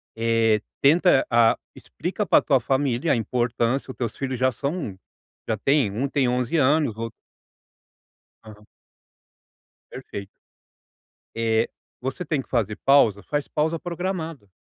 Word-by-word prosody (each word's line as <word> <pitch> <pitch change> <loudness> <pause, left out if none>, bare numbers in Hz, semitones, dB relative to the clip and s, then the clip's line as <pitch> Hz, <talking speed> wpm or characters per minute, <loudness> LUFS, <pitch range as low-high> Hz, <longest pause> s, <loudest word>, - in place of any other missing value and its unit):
Eh, 115 -1 +2 0.2
tenta 160 0 +5
ah, 115 -1 +4 0.2
explica - - -4
para - - +4
tua - - +3
família 135 +2 0
a - - +3
importância. 120 +3 -1
Teus 115 -3 -4
filhos 130 -2 -3
já 130 0 +3
são 140 - -4 0.5
já 110 - 0
têm 135 -2 +2
um 125 +8 -1
tem 135 -4 +1
11 125 +5 0
anos, 145 -4 +2
outro 115 0 -4 1.3
Aham. 105 -1 -14 1.3
Perfeito. 100 -1 -7 1.1
Eh, 115 0 +1 0.3
você 135 +7 -4
tem 150 -5 -1
que - - -19
fazer 110 -4 0
pausa 115 -8 +5
faz 145 -1 -2
pausa 160 +2 -1
programada. 170 - -4
130 Hz, 125 wpm, -24 LUFS, 115-145 Hz, 1.3 s, tenta